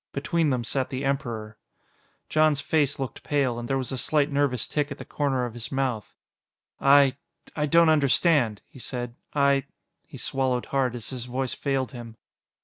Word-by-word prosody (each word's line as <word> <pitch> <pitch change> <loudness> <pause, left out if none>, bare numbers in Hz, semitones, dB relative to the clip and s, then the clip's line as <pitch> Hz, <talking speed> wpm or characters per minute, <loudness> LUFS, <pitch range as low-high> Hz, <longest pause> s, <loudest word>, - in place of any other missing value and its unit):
Between 155 +3 +1
them 125 -3 0
sat 130 +2 -1
the 135 0 -3
Emperor. 115 -6 -3 0.7
Jon's 155 -2 +3
face 145 -1 +1
looked 135 -2 -5
pale, 135 -5 0
and 120 - -5
there 135 - 0
was 130 -1 -3
a 130 - -2
slight 150 +1 +1
nervous 140 -4 +1
tic 150 -1 -1
at - - -5
the - - -9
corner 135 -4 -1
of 120 - -6
his 120 +1 -7
mouth. 130 -6 -2 0.6
"I... 140 -1 +5 0.4
I 150 -1 0
don't 165 +3 +5
understand," 145 - +3
he 130 - -15
said. 120 -1 -5 0.2
"I 140 -1 +3 0.2
" - - -47
He - - -10
swallowed 130 -2 -1
hard 130 -3 0
as 120 0 -6
his 125 -2 -5
voice 130 +1 -2
failed 135 -2 -1
him. 115 -3 -9
135 Hz, 180 wpm, -26 LUFS, 125-145 Hz, 0.7 s, I